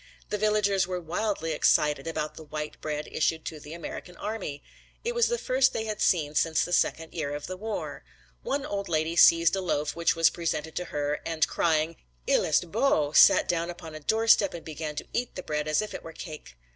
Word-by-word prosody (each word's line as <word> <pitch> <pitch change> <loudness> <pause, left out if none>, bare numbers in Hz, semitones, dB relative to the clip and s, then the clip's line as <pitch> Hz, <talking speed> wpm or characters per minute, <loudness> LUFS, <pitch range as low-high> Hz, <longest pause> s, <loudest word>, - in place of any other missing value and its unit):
The 210 - 0
villagers 205 -3 +2
were 180 -1 -3
wildly 175 0 -2
excited 150 -1 +2
about 155 -2 -3
the - - -11
white 150 0 -6
bread 150 -1 -3
issued 160 0 0
to 155 - -5
the 150 +2 -10
American 175 +1 -8
army. 195 -10 -5 0.4
It 475 +1 -1
was 475 -1 +3
the 475 - 0
first 260 - +2
they 220 - -2
had 215 -1 -4
seen 150 -5 +2
since 160 +1 +2
the 175 - -4
second 165 -1 +1
year 145 -3 -3
of 145 - -6
the 185 - -5
war. 190 - -5 0.4
One 280 0 -2
old 200 -6 -4
lady 160 0 0
seized 170 +1 +6
a 190 - -2
loaf 150 -5 -1
which 170 0 +2
was 165 0 +4
presented 160 -2 -3
to 180 - -2
her 145 -1 -2
and 160 -2 +1
crying 160 0 +1 0.3
"il - - +3
est 160 +2 +1
beau," 205 - +2
sat - - +7
down 170 0 0
upon 170 -2 -8
a 155 - -7
doorstep 220 +3 +3
and 170 - -9
began 155 -1 -5
to - - -6
eat 245 0 -2
the 185 - -6
bread 150 0 -2
as 155 +7 +2
if 215 - -7
it - - -6
were 165 - -10
cake. 155 - -9
165 Hz, 215 wpm, -27 LUFS, 155-200 Hz, 0.4 s, sat